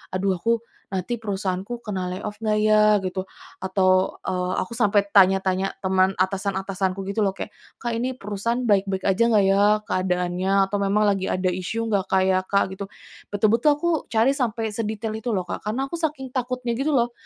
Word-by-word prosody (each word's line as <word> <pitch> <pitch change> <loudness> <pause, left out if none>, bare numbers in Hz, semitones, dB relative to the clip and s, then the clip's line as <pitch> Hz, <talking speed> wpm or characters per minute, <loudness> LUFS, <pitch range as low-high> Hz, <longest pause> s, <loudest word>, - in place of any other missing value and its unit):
"Aduh, 190 0 +1
aku 230 +2 +1 0.3
nanti 190 +5 -2
perusahaanku 200 +3 -3
kena 190 -3 -3
lay 185 - -6
off 210 0 -6
nggak 215 -1 +1
ya?" 215 0 +5 0.2
Gitu, 185 0 -3 0.4
atau, 185 0 +2
eee, 180 0 -1
aku 185 - -6
sampai 205 -3 +3
tanya-tanya 190 -1 +3
teman 190 0 +2
atasan-atasanku 190 0 -1
gitu 215 +2 -1
loh 195 - -2
kayak, - - -6 0.3
"Kak, 235 -1 -2
ini 255 +1 -2
perusahaan 210 +5 -2
baik-baik 195 -3 +1
aja 195 +4 +3
nggak 205 -3 +4
ya 195 +1 +4 0.2
keadaannya 180 +1 0 0.2
atau 205 - -1
memang 200 +2 +2
lagi 195 -1 -2
ada 185 0 0
isu 185 +6 -3
nggak, 200 -2 +1
Kak, 190 -1 +4
ya, 190 0 +3
Kak?" 200 - +2
Gitu. 200 0 -5 0.5
Betul-betul 225 +7 +3
aku 345 +3 0 0.2
cari 230 +4 +4
sampai 225 -4 -1
sedetail 220 0 -3
itu 240 +1 -3
loh, 185 - 0
Kak, - - -4
karena 240 +6 -1
aku - - -2
saking 285 -5 -3
takutnya 250 -1 -2
gitu 285 +1 0
loh, 240 -1 +2
200 Hz, 180 wpm, -23 LUFS, 190-230 Hz, 0.5 s, ya